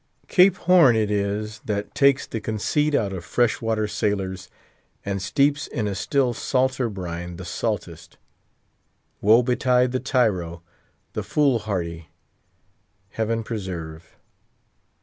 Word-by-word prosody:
Cape 185 0 +5
Horn 170 -9 +5
it 110 -2 +1
is 105 +2 -2
that 105 -1 -3
takes 140 -1 +3
the 110 - -5
conceit 145 +8 0
out 100 -7 0
of 90 -3 -6
fresh 120 +7 +1
water 110 -2 0
sailors, 95 -3 -2 0.6
and 100 -1 -2
steeps 140 +8 +1
in 110 -3 -3
a 100 - -2
still 125 +5 0
salter 130 0 0
brine 85 -3 -6
the 90 +1 -8
saltest. 85 - -4 1.0
Woe 110 +4 +5
betide 125 0 +2
the 130 - -1
tyro; 95 -11 0 0.5
the - - -2
fool 140 -5 +2
hardy, 85 -6 -4 1.0
Heaven 115 +2 -2
preserve! 85 -7 -7
110 Hz, 125 wpm, -23 LUFS, 95-125 Hz, 1.0 s, Cape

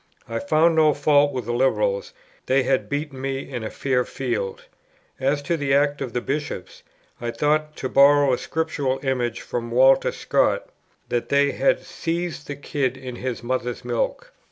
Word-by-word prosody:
I - - -3
found 165 - +3
no 155 -2 +4
fault 145 0 +4
with 125 -4 -4
the 120 - -2
Liberals; 105 -6 +1 0.4
they 130 0 +3
had 135 +1 0
beaten 145 -2 -3
me 135 0 -3
in 125 -4 -5
a 110 - -3
fair 130 -2 0
field. 475 - -3 0.6
As 140 +2 0
to 170 +4 0
the 140 -2 +1
act 145 0 +2
of 130 -3 -3
the 125 - -1
Bishops, 140 -10 -4 0.4
I 120 - -2
thought, 150 +4 0
to 130 - -3
borrow 140 0 +5
a 125 - 0
Scriptural 145 -5 -2
image 125 -4 -1
from 120 -1 -4
Walter 130 +3 +5
Scott, - - +1 0.4
that 120 - -1
they 140 0 +3
had - - +1
"seethed 170 -3 -4
the 145 - -4
kid 135 -2 -2
in 125 -2 -7
his 125 -2 -4
mother's 125 0 -3
milk." 120 -1 -2
135 Hz, 175 wpm, -23 LUFS, 125-145 Hz, 0.6 s, borrow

